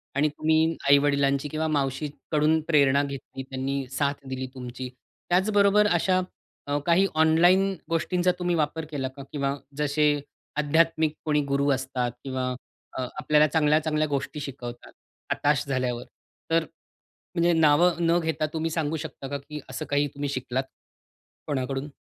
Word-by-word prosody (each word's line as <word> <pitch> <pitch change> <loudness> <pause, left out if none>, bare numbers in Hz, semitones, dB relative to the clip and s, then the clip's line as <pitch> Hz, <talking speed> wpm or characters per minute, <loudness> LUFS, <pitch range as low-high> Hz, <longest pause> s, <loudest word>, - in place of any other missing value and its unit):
आणि 145 +2 +3
तुम्ही 160 +2 +2
आई-वडिलांची 140 0 +3
किंवा 155 +2 -1
मावशीकडून 150 +2 0
प्रेरणा 140 -3 +4
घेतली, 140 -1 -6
त्यांनी 135 +1 -3
साथ 140 +1 -1
दिली 130 0 -3
तुमची. 125 0 -6 0.4
त्याचबरोबर 200 +2 +4
अशा 185 +2 +2 0.5
अ, 145 - 0
काही 175 +3 +4
ऑनलाईन 175 +5 +4 0.2
गोष्टींचा 175 +2 +1
तुम्ही 175 -1 0
वापर 155 0 -1
केला 135 -3 -2
का? 135 +1 -10
किंवा 140 -1 -1 0.2
जसे 150 0 +1 0.5
आध्यात्मिक 160 +1 +2
कोणी 150 -1 +2
गुरु 140 +1 +2
असतात 130 -2 -2
किंवा 130 -1 -2 0.5
अ, 130 - -1 0.2
आपल्याला 150 0 +4
चांगल्या-चांगल्या 155 0 +2
गोष्टी 145 +2 -3
शिकवतात, 125 -4 -7 0.4
हताश 145 -2 +2
झाल्यावर. 125 -3 -1 0.5
तर 165 0 +4 0.7
म्हणजे 170 0 +3
नाव 160 +2 +5
न 170 0 +3
घेता 160 -2 -1
तुम्ही 160 0 -1
सांगू 160 -1 -1
शकता 150 -3 -7
का 140 - -2
की 150 +2 -8
असं 130 - -5
काही 145 0 +2
तुम्ही 145 0 -3
शिकलात? 130 -1 -2 0.8
कोणाकडून? 135 0 -2
150 Hz, 135 wpm, -26 LUFS, 135-160 Hz, 0.8 s, नाव